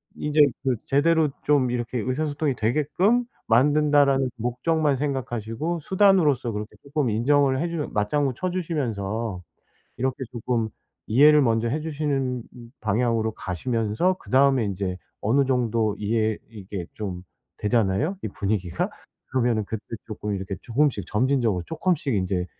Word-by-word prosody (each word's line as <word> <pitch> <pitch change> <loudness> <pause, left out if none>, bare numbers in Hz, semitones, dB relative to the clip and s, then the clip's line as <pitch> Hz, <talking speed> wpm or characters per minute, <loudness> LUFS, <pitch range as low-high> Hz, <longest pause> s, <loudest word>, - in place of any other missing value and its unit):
인제 150 +1 -1 0.2
그 130 -2 +1
'제대로 155 +2 +3
좀 140 -4 +3
이렇게 120 0 -2
의사소통이 145 +3 -1
되게끔 150 - +2 0.2
만든다.'라는 140 +1 +4
목적만 135 +5 0
생각하시고 135 +2 -2
수단으로서 170 - +3
그렇게 105 0 -6
쪼끔 140 -2 -1
인정을 130 +4 +2
해 170 - -1
주면 165 -3 -4
맞장구쳐 135 - 0
주시면서 115 - -2 0.6
이렇게 130 +1 0 0.2
조금 120 -2 -1 0.4
이해를 150 +6 +6
먼저 115 -1 +1
해 150 +6 -1
주시는 140 -5 -2 0.4
방향으로 110 +1 +1
가시면서 110 - 0
그다음에 135 -1 +3
인제 95 -2 -3 0.2
어느 130 +7 +3
정도 115 -5 +1
이해 110 +1 0
이게 100 -5 -7
좀 95 -4 -5 0.4
되잖아요 115 - +1
이 - - -1
분위기가? 95 -4 -2 0.4
그러면은 120 -4 +1
그때 110 +1 -5 0.2
쪼끔 105 -1 -4
이렇게 95 0 -4
조금씩 125 - +1
점진적으로 115 -5 +1
쪼끔씩 165 -4 0
인제 95 -2 0
125 Hz, 330 characters per minute, -24 LUFS, 110-145 Hz, 0.6 s, 이해를